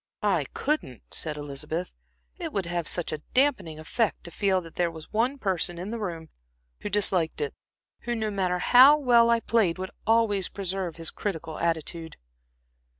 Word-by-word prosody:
"I - - +2
couldn't," 285 - -2
said 155 -2 -2
Elizabeth, 145 +4 -4 0.5
"it - - -4
would 195 -3 -1
have 175 -1 -2
such 175 - 0
a 155 - -3 0.2
dampening 250 - +2
effect 205 +8 -1
to 170 - -7
feel 195 +1 +1
that 165 -2 -12
there 175 -1 +1
was 160 +2 -11
one 245 +6 +1
person 185 -6 -1
in 185 +5 -5
the 235 - -4
room 170 -6 -5 0.5
who - - -5
disliked 190 -5 +1
it, 445 - -2 0.5
who, 240 0 -3
no 220 -2 -2
matter 185 -3 0
how 260 +10 +7
well 240 -5 +5
I 235 0 +3
played, 210 -9 +2
would 185 0 -5 0.2
always 220 -4 +3
preserve 190 -3 -3
his 165 -1 -3
critical 160 -6 -4
attitude. 165 0 -2
185 Hz, 170 wpm, -27 LUFS, 165-225 Hz, 0.5 s, how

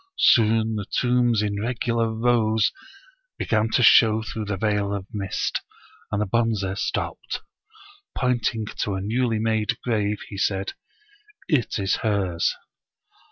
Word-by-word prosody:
Soon 110 -1 +4
the 100 - -5
tombs 120 -3 +2
in 100 -1 -2
regular 115 -1 0
rows 110 -1 +2 0.7
began 110 0 +1
to 125 - +2
show 110 -1 +6
through 110 0 -5
the 100 -1 -3
veil 100 0 0
of 95 -2 -5
mist, 100 -3 -2 0.5
and 100 - 0
the 105 - +1
Bonze 115 -1 0 0.2
stopped. - - -3 0.8
Pointing 120 -3 0
to 100 - -1
a - - -2
newly 115 +3 0
made 110 -1 0
grave 105 -3 0
he 100 - -6
said 95 0 -1 0.4
" 415 - -30 0.3
It 140 -9 +1
is 95 -2 0
hers." 95 -6 0
110 Hz, 135 wpm, -24 LUFS, 100-115 Hz, 0.8 s, show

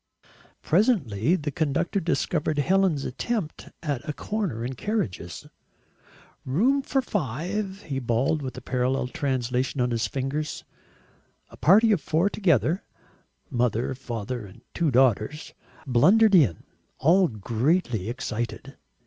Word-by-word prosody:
Presently 165 - +2
the 150 -4 -3
conductor 160 +6 0
discovered 160 -3 -1
Helen's 175 -1 +2
attempt 180 - -3
at 145 -3 -3
a - - -1
corner 170 - -3
in 130 - -3
carriages. 120 - -3 1.0
"Room 235 - +2
for 270 -1 0
five," 190 - -3
he 140 -6 -3
bawled 130 +5 0
with 130 -2 -6
a - - -6
parallel 125 +1 0
translation 130 0 -1
on 125 0 +1
his 115 -2 0
fingers. 140 +5 -3 0.9
A - - -12
party 220 +7 +5
of 195 -7 +2
four 170 +6 +1
together 165 - +1 0.7
mother, 120 0 0
father, 120 -2 -5
and 95 - -16
two 170 -3 +1
daughters 130 +2 +1 0.3
blundered 190 - +5
in, 135 - +4 0.3
all 175 +6 +4
greatly 115 - 0
excited. 120 -2 -5
140 Hz, 120 wpm, -25 LUFS, 125-180 Hz, 1.0 s, party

